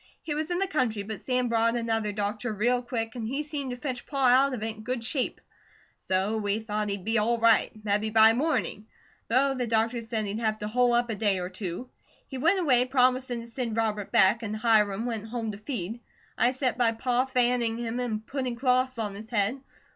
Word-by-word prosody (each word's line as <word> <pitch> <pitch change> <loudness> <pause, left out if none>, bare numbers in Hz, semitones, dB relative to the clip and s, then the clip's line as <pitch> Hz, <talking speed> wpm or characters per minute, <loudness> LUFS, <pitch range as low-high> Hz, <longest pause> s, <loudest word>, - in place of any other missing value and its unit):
He 300 - -3
was 310 +2 -3
in 350 - 0
the 390 - +2
country 250 - -1
but 210 -1 -6
Sam 250 -1 0
brought 230 0 +2
another 225 -2 -1
doctor 210 +3 -2
real 240 +4 +1
quick, 230 -2 -3
an' 230 -3 -4
he 275 +5 -2
seemed 290 -3 -3
to 245 - -4
fetch 255 -2 -5
Pa 275 -3 +2
out 265 +3 +5
of 240 -4 -4
it 220 0 -3
in - - -10
good 250 +1 -3
shape, 255 +2 -1 0.6
so 190 +4 0
we 205 0 0
thought 210 -1 -3
he'd 200 -2 -4
be 225 0 +2
all 235 +3 +1
right, 230 -1 +4 0.2
mebby 210 +1 +1
by 220 0 +6
morning, 245 -6 -1 0.4
though 270 +4 +3
the 250 -2 -2
doctor 230 +1 +1
said 225 -1 -3
he'd 205 +2 -3
have 220 -2 0
to 210 - -5
hole 245 +2 +2
up 240 0 +2
a - - -2
day 205 -2 +1
or 180 0 -4
two. 185 +4 -5 0.4
He 265 - -6
went 340 +8 +3
away, 255 -8 +4
promisin' 255 -1 +1
to - - -9
send 235 -1 -4
Robert 210 -3 -1
back, 195 +5 +4
and 215 -2 -4
Hiram 215 -1 +2
went 225 -3 -4
home 225 -1 -3
to 200 - -9
feed. 220 -2 -5 0.4
I 245 - +2
set 260 -2 -1
by 230 -2 +3
Pa 245 +2 0
fanning 245 -3 +1
him 235 0 -3
an' 225 -4 -2
putting 255 +1 -3
cloths 255 0 +1
on 210 -3 -2
his 215 +2 -9
head. 230 +3 0
230 Hz, 220 wpm, -27 LUFS, 215-250 Hz, 0.6 s, by